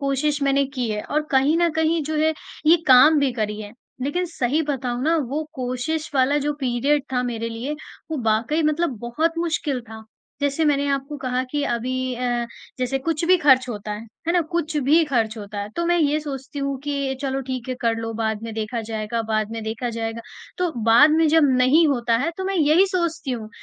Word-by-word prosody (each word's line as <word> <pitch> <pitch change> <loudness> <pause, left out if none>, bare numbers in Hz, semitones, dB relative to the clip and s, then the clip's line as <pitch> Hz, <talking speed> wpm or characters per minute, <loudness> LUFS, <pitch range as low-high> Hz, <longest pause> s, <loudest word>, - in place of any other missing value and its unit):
कोशिश 285 +2 0
मैंने 275 0 +3
की 245 -2 -1
है 210 0 -2
और 305 +1 -1
कहीं 275 +4 +3
न 345 0 +3
कहीं 320 0 +2
जो 310 +1 -2
है 315 +1 +3 0.3
ये 330 - +7
काम 280 +4 +7
भी 275 -2 +1
करी 215 -2 -3
है। 205 0 -8 0.3
लेक़िन 320 +7 -1
सही 305 -3 -1
बताऊँ 255 -4 -2
ना 325 +3 +2
वो 305 +2 -1
कोशिश 255 +5 -3
वाला 270 +2 +3
जो 295 +1 -1
पीरियड 270 +3 +1
था 250 0 +1
मेरे 230 -2 -3
लिए 240 +6 -4 0.4
वो 315 - -1
वाक़ई 235 +9 +1
मतलब 305 -2 0
बहुत 315 +9 -1
मुश्किल 315 -6 -1
था। 220 0 -10 0.4
जैसे 285 +2 +1
मैंने 285 -1 +2
आपको 275 +1 -2
कहा 255 -1 -1
कि 290 0 -1
अभी 255 +1 -2
अ, 240 -1 -1 0.3
जैसे 255 +1 0
कुछ 325 +3 -1
भी 370 +1 +6
ख़र्च 265 -5 +4
होता 210 -2 -5
है, 210 - -5 0.3
है 335 - +2
ना? 355 - +3
कुछ 320 -1 -2
भी 325 +3 +5
ख़र्च 230 -6 0
होता 205 0 -7
है 205 - -4
तो 340 - 0
मैं 345 0 +3
ये 300 0 +2
सोचती 280 0 -7
हूँ 275 0 -1
कि 280 -1 -2
चलो 270 -1 -2
ठीक 255 -1 -4
है 255 - -1
कर 230 -1 +1
लो 225 0 -4
बाद 220 -1 -2
में 230 0 -5
देखा 220 +2 -3
जाएगा, 220 +1 -3
बाद 215 -1 -1
में 225 -1 -5
देखा 225 +3 -3
जाएगा। 225 0 -3 0.4
तो 360 -2 +1
बाद 235 +7 +7
में 320 +1 +4
जब 310 -2 +5
नहीं 280 +6 +5
होता 240 -4 +1
है 280 +8 0
तो 380 - -4
मैं 390 - -1
यही 320 +5 +4
सोचती 340 -6 -2
हूँ 225 -4 -4
270 Hz, 215 wpm, -22 LUFS, 235-310 Hz, 0.4 s, ये